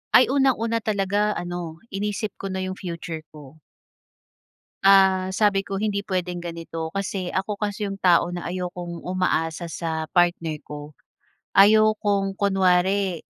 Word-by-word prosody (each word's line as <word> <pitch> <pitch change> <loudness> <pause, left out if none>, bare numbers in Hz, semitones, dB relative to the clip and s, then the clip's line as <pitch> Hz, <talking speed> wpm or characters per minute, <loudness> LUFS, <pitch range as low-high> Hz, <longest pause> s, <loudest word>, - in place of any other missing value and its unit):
Ay 255 +1 +6
unang-una 240 -5 +2
talaga 205 0 0
ano 175 -1 -5
inisip 210 +2 -2
ko 195 - -4
na 190 -1 -3
yung 185 0 -5
future 170 -3 -6
ko. 150 0 -14 1.3
Ah, 190 -1 +5
sabi 200 -1 +2
ko 195 +1 -4
hindi 200 -2 -1
pwedeng 180 -1 -2
ganito 165 -1 -6
kasi 195 -2 -3
ako 200 +2 -2
kasi 205 0 -2
iyong 195 - -5
tao 175 -2 +4
na 175 0 -5
ayokong 175 -1 -5
umaasa 175 -3 -1
sa 160 -1 -3
partner 170 -4 +1
ko. 150 +1 -9 0.7
Ayokong 205 -1 +4
kunwari, 190 -2 +2
185 Hz, 130 wpm, -24 LUFS, 170-200 Hz, 1.3 s, Ay